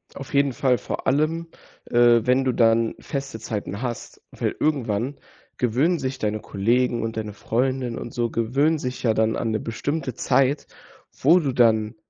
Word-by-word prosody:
Auf 135 - -9
jeden 140 -1 +3
Fall, 125 +1 +2
vor - - -5
allem, 155 +5 +1 0.4
äh, 120 -1 +5
wenn 130 +2 +3
du 130 - +2
dann 115 -1 +3
feste 135 -5 -5
Zeiten 105 -1 -5
hast, 120 -2 -5
weil - - -2
irgendwann 130 -3 0 0.4
gewöhnen 135 +9 +2
sich 130 0 -3
deine 105 0 -1
Kollegen 120 +5 0
und 115 0 -4
deine 105 -2 -4
Freundin 125 +2 -1
und 120 - -7
so 120 -1 0
gewöhnen 135 +9 +1
sich 125 -2 -4
ja 115 -3 +3
dann 110 0 +1
an 115 - -1
'ne 110 - 0
bestimmte 135 +4 -3
Zeit, 135 +5 +1 0.5
wo 165 +7 +5
du 145 -6 -1
dann 110 -2 +3
125 Hz, 170 wpm, -23 LUFS, 115-135 Hz, 0.5 s, äh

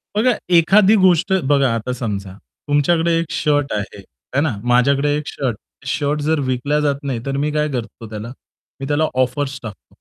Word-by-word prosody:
बघा, 245 +4 +3 0.2
एखादी 190 +5 +5
गोष्ट 185 +1 +3 0.2
बघा 140 -2 +4
आता 115 +3 -3
समजा 100 -6 -4 0.3
तुमच्याकडे 165 +4 +2
एक 165 - -1
शर्ट 145 -2 0
आहे, 105 -1 -4 0.4
आहे 140 - +2
ना, 145 -7 0
माझ्याकडे 140 +4 +2
एक 150 - -4
शर्ट, 130 -5 -2 0.3
शर्ट 145 +1 -1
जर 155 +1 +1
विकला 140 +4 0
जात 145 -2 +1
नाही 135 -4 -2
तर 135 0 -2
मी 150 +2 0
काय 150 0 0
करतो 115 -3 -6
त्याला? 110 +2 -6 0.5
मी 135 - -5
त्याला 150 +2 +1 0.2
ऑफर्स 135 +2 -3
टाकतो. 110 -3 -9
140 Hz, 175 wpm, -19 LUFS, 125-150 Hz, 0.5 s, एखादी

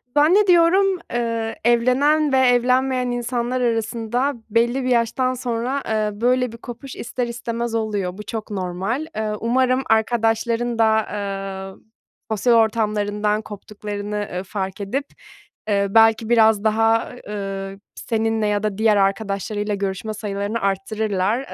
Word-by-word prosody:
zannediyorum, 365 +3 +4 0.2
ııı, 230 -1 -1
evlenen 270 +5 +3
ve - - +5
evlenmeyen 250 0 +2
insanlar 245 +1 -2
arasında 235 +3 0 0.2
belli 240 +4 +1
bir 255 - -1
yaştan 245 +2 +1
sonra, 250 +2 -2
eee, 215 -1 -1
böyle 250 -1 +2
bir 230 - -10
kopuş 245 +3 -9
ister 240 +1 -3
istemez 235 -1 -3
oluyor. 205 -4 -2
Bu 210 - -7
çok 220 -1 -6
normal. 195 - -2
Eee, 215 -1 -2
umarım 255 +2 +1
arkadaşların 230 +1 +1
da, 220 -1 +3 0.7
eee, - - -27 0.5
sosyal 235 +3 +2
ortamlarından 210 -1 +1
koptuklarını, 205 0 -6
ııı, 180 +1 -3
fark 190 0 -5
edip, 270 +9 -2 0.6
ııı, 200 0 0
belki 225 0 +5
biraz 220 -3 +4
daha, 225 +1 +2 0.2
ııı, 195 -1 -5 0.2
seninle 225 -1 -1
ya 205 0 0
da 210 -2 -2
diğer 220 -2 +3
arkadaşlarıyla 200 +1 -1
görüşme 200 +2 -3
sayılarını 205 +1 -3
arttırırlar. 200 +2 0
225 Hz, 125 wpm, -21 LUFS, 210-245 Hz, 0.7 s, ve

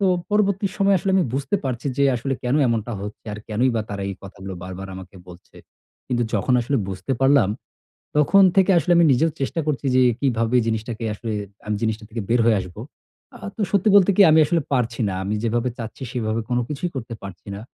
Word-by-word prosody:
তো 195 - +2 0.2
পরবর্তী 200 -1 +2
সময়ে 195 -1 +4
আসলে 195 - -1
আমি 185 - +3
বুঝতে 140 +7 0
পারছি 125 0 -3
যে 140 - +4
আসলে 135 +3 -2
কেন 125 +3 +1
এমনটা 115 0 -1
হচ্ছে 105 +3 -8
আর 105 - -6
কেনই 115 +4 +1
বা 110 - 0
তারা 100 -1 -4
এই 100 - -4
কথাগুলো 95 0 -8
বারবার 95 +1 -7
আমাকে 95 +1 -11
বলছে। 90 0 -15 0.5
কিন্তু 120 -1 0
যখন 110 +5 +1
আসলে 130 +4 -1
বুঝতে 95 +6 -4
পারলাম, 135 -6 +5 0.7
তখন 175 +7 +5
থেকে 195 0 +5
আসলে 175 +1 +1
আমি 170 - +6
নিজেও 160 +6 +2
চেষ্টা 135 +5 -1
করছি 145 -2 -1
যে 130 - +5 0.2
কিভাবে 115 -3 +1
জিনিসটাকে 110 +1 -3
আসলে 110 +2 -5 0.3
আমি 105 0 -1
জিনিসটা 110 0 -1
থেকে 115 0 -4
বের 120 +1 +3
হয়ে 110 -3 +4
আসব। 90 -2 -9 0.6
আ - - -12 0.2
তো - - -7
সত্যি 200 +1 +2
বলতে 200 -1 +6
কি 205 - +7
আমি 155 - +5
আসলে 170 +2 +1
পারছি 120 -3 0
না। 95 - -3
আমি 100 +2 -2
যেভাবে 120 +2 0
চাচ্ছি 115 +3 -7
সেভাবে 115 -2 -1
কোন 125 -1 +1
কিছুই 155 +4 -3
করতে 115 -2 -5
পারছি 95 -2 -10
না। 100 - -7
120 Hz, 205 wpm, -22 LUFS, 110-145 Hz, 0.7 s, কি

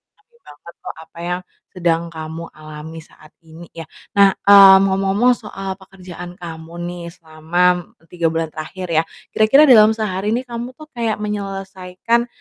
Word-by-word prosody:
ngerti 450 +3 -35
banget 150 +4 -14
kok - - -7
apa 165 - -16
yang 180 +1 -3 0.3
sedang 170 -2 -1
kamu 160 +1 -8
alami 155 +1 -10
saat 155 -1 -18 0.2
ini 160 +2 -12
ya, 165 -1 -9 0.2
nah, 200 -1 +4
mmm, 195 -1 +8
ngomong-ngomong 195 +5 +2
soal 195 -3 -7
pekerjaan 180 -2 -11
kamu 165 -2 -10
nih 175 0 -6
selama 175 +2 0
e - - -34
3 170 -2 0
bulan 160 -1 -2
terakhir 180 +4 -7
ya, 160 0 +3 0.3
kira-kira 220 +7 +5
dalam 220 -6 +6
sehari 210 0 -2
nih 250 - -2
kamu 240 +1 -7
tuh 310 0 -14
kayak 230 -4 -2
menyelesaikan, 195 +2 -3
185 Hz, 155 wpm, -19 LUFS, 165-210 Hz, 0.3 s, mmm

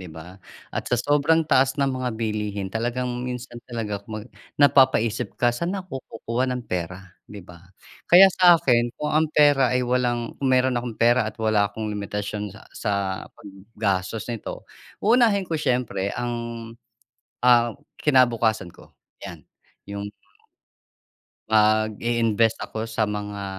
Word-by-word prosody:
'di 90 - -9
ba? 80 +4 -12 0.3
At - - -4
sa 125 - +2
sobrang 145 +5 +2
taas 130 -3 +2
ng 140 -2 +1
mga 130 -1 -2
bilihin 105 -3 -3
talagang 120 +3 -2 0.2
minsan 125 -1 -6
talaga 110 -4 -4
kumbaga, 110 +2 -9 0.2
napapa-isip 130 -5 +3
ka, 120 -1 +2
"Saan 170 +10 -3
ako 180 -8 -6
kukuha 115 +3 -2
ng 125 -1 -3
pera?" 90 0 -4 0.2
'Di 100 -3 -10
ba? 90 0 -16 0.4
Kaya 190 +2 +8
sa 180 -2 +6
akin, 120 -6 +2
kung 150 - -3
ang 155 0 +2
pera 145 -4 +4
ay 125 - 0
walang 120 -1 -1
kung 135 - 0
meron 130 -1 +2
akong 120 -2 -7
pera 120 -1 +3
at - - -11
wala 110 -2 +1
akong 110 - -7
limitasyon 105 0 -4
sa 105 +3 -14
sa 105 - -3 0.4
paggastos 100 0 -4
neto, 115 - -7 0.4
uunahin 220 -3 +4
ko 170 - -8
syempre 120 -8 -1
ang 120 0 -2 1.1
ah, 120 -1 +4 0.3
kinabukasan 120 -7 +3
ko 85 - -16 0.3
'yan. - - -10 0.4
Yung 100 0 -6 1.4
Mag-i-invest 110 +1 +2
ako 110 +1 -5
sa 115 -1 0
mga, 105 -1 -5
115 Hz, 140 wpm, -23 LUFS, 105-130 Hz, 1.4 s, Kaya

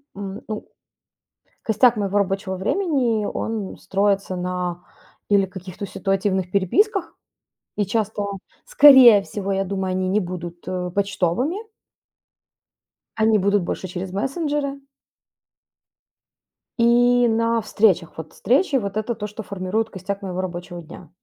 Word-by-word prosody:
м, 200 +1 -6
ну 215 -1 -6 1.0
Костяк 225 +2 +3
моего 205 0 0
рабочего 195 -1 -1
времени, 240 - 0
он 220 -4 -4
строится 195 -1 0
на 180 -1 -3 0.5
или 200 -2 +4
каких-то 185 +1 -8
ситуативных 190 -2 -1
переписках, 360 - +1 0.6
и 205 - +1
часто, 210 0 -1 0.4
скорее 265 - +8
всего, 200 0 -5
я 195 0 0
думаю, 190 -1 -3
они 185 0 -1
не 205 +2 +2
будут, 175 -2 -7
э, 180 -1 -3
почтовыми 200 - 0 1.6
Они 220 -1 +3
будут 200 -1 +2
больше 185 - -4
через 180 +1 -6
мессенджеры. 280 - -2 2.0
И 245 +1 +4
на 230 0 +1
встречах. 190 -7 +1
Вот 160 -1 -8
встречи. 270 - +1
Вот 200 -4 -1
это 220 +2 -2
то, 210 -1 -5
что 210 +1 -8
формирует 200 +4 -2
костяк 195 +1 -5
моего 185 -1 -3
рабочего 175 -1 -6
дня. 165 0 -13
200 Hz, 120 wpm, -22 LUFS, 185-225 Hz, 2.0 s, скорее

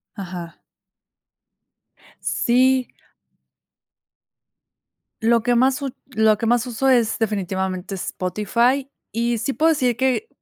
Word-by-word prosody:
Ajá. 175 -3 -7 1.6
Sí. 255 +1 +2 2.3
Lo 230 +1 +3
que 245 0 +2
más 260 +4 +2
u 270 -2 -4 0.2
lo 220 -1 +4
que 230 - -3
más 235 +1 +2
uso 250 +3 0
es 240 -4 +3
definitivamente 190 -3 -2
Spotify. 235 +9 0 0.2
Y 235 +2 0
sí 240 +5 -2
puedo 320 +4 +3
decir 255 -6 +1
que, 265 - 0
235 Hz, 105 wpm, -21 LUFS, 210-260 Hz, 2.3 s, lo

